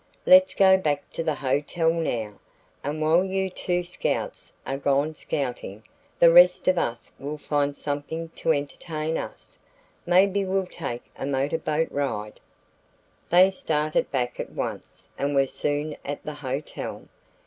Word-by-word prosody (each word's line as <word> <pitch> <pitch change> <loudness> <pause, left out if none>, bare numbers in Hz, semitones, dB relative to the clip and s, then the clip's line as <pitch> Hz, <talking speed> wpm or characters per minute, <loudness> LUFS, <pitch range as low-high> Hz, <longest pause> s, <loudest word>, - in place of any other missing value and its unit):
Let's 280 0 +7
go 190 -1 +6
back 150 -5 -2
to - - -4
the 160 -2 0
hotel 145 +5 0
now, 115 -11 -3 0.4
and 150 +2 -2
while 165 +4 +4
you 190 0 -1
two 180 -1 -1
scouts 175 0 -3
are 135 +1 -3
gone 140 +2 +1
scouting, 125 -8 -4 0.3
the 170 - +7
rest 180 +1 +6
of 185 -1 +4
us 115 0 -3
will 145 +2 -5
find 145 -1 -1
something 150 +3 -4
to 165 - -1
entertain 155 +2 -2
us. - - -7 0.5
Maybe 195 +3 +4
we'll 190 0 0
take 120 -8 -5
a 135 - -4
motorboat 150 +3 0
ride." 115 -7 -3 0.9
They 185 +2 +6
started 155 -4 0
back 125 -3 -2
at - - -4
once - - -6
and 140 +1 0
were 135 0 +4
soon 145 +2 -2
at 145 +1 -5
the 150 - -4
hotel. 145 0 -5
150 Hz, 145 wpm, -25 LUFS, 140-175 Hz, 0.9 s, Let's